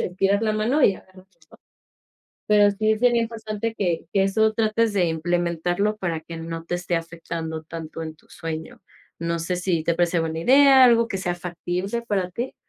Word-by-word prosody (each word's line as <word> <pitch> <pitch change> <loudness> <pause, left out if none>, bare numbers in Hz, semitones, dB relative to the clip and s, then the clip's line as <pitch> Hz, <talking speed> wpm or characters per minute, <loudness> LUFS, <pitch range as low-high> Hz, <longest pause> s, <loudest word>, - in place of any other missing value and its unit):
estirar 195 +3 0
la 215 - +1
mano 235 +8 +1
y 200 - +4
agarrarlo, 185 0 -17 0.2
¿no?, - - -17 0.9
pero 205 -1 +5
sí 215 +2 +1
sería 240 -1 +3
importante 225 -1 -4
que 175 -4 -1
que 195 -1 +3
eso 220 +3 +2
trates 220 0 +1
de 185 -3 +2
implementarlo 175 +4 -1
para 170 -5 -3
que 165 +1 -9
no 165 0 -6
te 175 - -4
esté 175 0 -2
afectando 165 -1 -5
tanto 165 0 -7
en 160 0 -7
tu - - -27
sueño, 160 -1 -7 0.4
no 170 0 -1
sé, 175 +2 -2
¿si 180 -3 -1
te 170 - +1
parece 175 0 +1
buena 160 0 -2
idea? 270 +6 +6
Algo 235 -2 +5
que 195 - -3
sea 175 -2 -2
factible 180 +5 -4
para 195 -5 -1
ti. 240 +7 -4
180 Hz, 185 wpm, -23 LUFS, 165-215 Hz, 0.9 s, idea